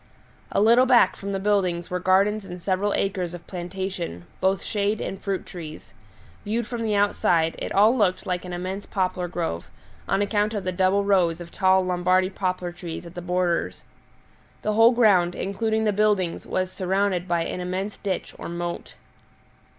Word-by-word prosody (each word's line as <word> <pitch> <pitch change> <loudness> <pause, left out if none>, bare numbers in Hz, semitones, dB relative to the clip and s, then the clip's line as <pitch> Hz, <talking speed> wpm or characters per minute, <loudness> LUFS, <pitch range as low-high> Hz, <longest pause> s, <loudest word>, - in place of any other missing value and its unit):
A - - +1
little 235 +5 +5
back 245 -2 +5
from 200 0 -6
the 195 - -1
buildings 185 -4 0
were 180 - -1
gardens 195 +4 +2
and 180 -2 -8
several 190 +3 0
acres 185 -3 -1
of 175 - -11
plantation 180 - -5
both 190 -1 +1
shade 205 0 -1
and 195 - -5
fruit 195 -2 -2
trees. 160 -4 -9 0.5
Viewed 225 +3 -1
from 235 +1 -5
the 215 -2 0
outside, 175 -5 +2
it - - -4
all 215 +5 +5
looked 195 -6 +1
like 180 -1 -2
an 180 - -7
immense 185 +3 -4
poplar 185 -2 -1
grove, 165 - -4 0.4
on 195 +1 +2
account 210 +1 0
of 205 - -2
the 185 - -1
double 190 +2 +2
rows 180 -5 +2
of 170 -1 -9
tall 190 -1 +3
Lombardy 185 +1 +2
poplar 185 -2 -2
trees 175 -1 -7
at 170 - -10
the 175 - -6
borders. 175 - -1 0.8
The 215 - 0
whole 225 +2 +6
ground, 195 -7 +4
including 220 +3 -1
the 210 -1 +2
buildings, 205 -4 +1
was 185 0 -1
surrounded 185 0 0
by 170 -1 +1
an 180 - -4
immense 185 +3 -3
ditch 195 -3 -3
or - - -6
moat. 170 0 -5
185 Hz, 175 wpm, -24 LUFS, 175-205 Hz, 0.8 s, whole